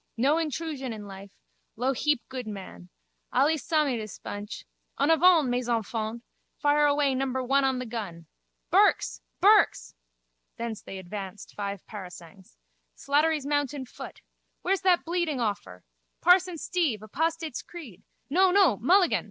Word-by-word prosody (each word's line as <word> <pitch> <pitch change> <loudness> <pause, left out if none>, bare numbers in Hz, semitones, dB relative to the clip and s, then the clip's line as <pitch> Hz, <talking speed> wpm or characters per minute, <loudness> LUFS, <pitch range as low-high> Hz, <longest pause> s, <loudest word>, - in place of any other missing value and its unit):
No 280 +7 +3
hentrusion 305 -5 -3
in 210 -2 -8
life. 195 0 -10 0.5
Lou 255 +4 0
heap 295 0 0
good 255 -3 -6
man. 185 - -9 0.4
Allee 310 +3 +3
samee 300 -4 0
dis 215 -2 -7
bunch. 205 +2 -7 0.3
En 285 +3 +3
avant, 325 -2 +5
mes 245 0 -1
enfants! 225 0 -2 0.3
Fire 295 0 +3
away 285 -1 +2
number 260 0 -1
one 275 +2 +2
on 265 -1 +1
the 255 - -4
gun. 205 -8 -6 0.5
Burke's! - - +3 0.2
Burke's! - - +4 0.6
Thence 230 -2 -4
they 195 - -8
advanced 190 +1 -8
five 200 -2 -5
parasangs. 185 -3 -11 0.4
Slattery's 300 +1 +1
mounted 285 -2 -1
foot. - - -10 0.4
Where's 385 +1 +1
that 370 -2 +3
bleeding 340 -4 -1
awfur? 200 - -3 0.4
Parson 360 0 +4
Steve, 310 - -1
apostates' 320 +5 -2
creed! 275 - -11 0.3
No, 370 +7 +4
no, 365 - +4
Mulligan! 355 - +4
260 Hz, 135 wpm, -27 LUFS, 215-315 Hz, 0.6 s, avant